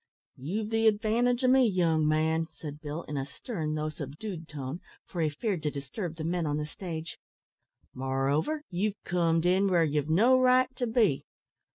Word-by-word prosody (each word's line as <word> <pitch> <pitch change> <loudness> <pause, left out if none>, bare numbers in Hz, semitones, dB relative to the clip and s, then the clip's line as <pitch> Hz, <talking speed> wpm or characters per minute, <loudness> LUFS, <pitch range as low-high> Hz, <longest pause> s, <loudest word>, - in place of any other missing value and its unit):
"You've 205 - -3
the 225 0 +3
advantage 230 +4 +2
o' - - +4
me, 260 +1 +6
young 165 -6 +2
man," 160 +1 +2
said 150 -1 -8
Bill, 155 +2 -5
in 150 - -5
a 135 - -2
stern, 155 - -4
though 155 0 -1
subdued 160 +4 -7
tone, 145 +1 -5 0.3
for 175 - -4
he 155 - +2
feared 180 +3 -2
to 150 - 0
disturb 150 +5 -5
the 160 - -6
men 170 0 -1
on 145 0 0
the 150 - -2
stage; 165 0 -6 0.7
"moreover, 135 - 0
you've 200 +3 -1
comed 165 -1 +1
in 190 +3 +4
where 175 -3 +4
ye've 150 -2 0
got 160 - +2
no 250 +7 +5
right 255 0 +4
to 245 - -1
be. 220 - +2
165 Hz, 185 wpm, -29 LUFS, 150-215 Hz, 0.7 s, me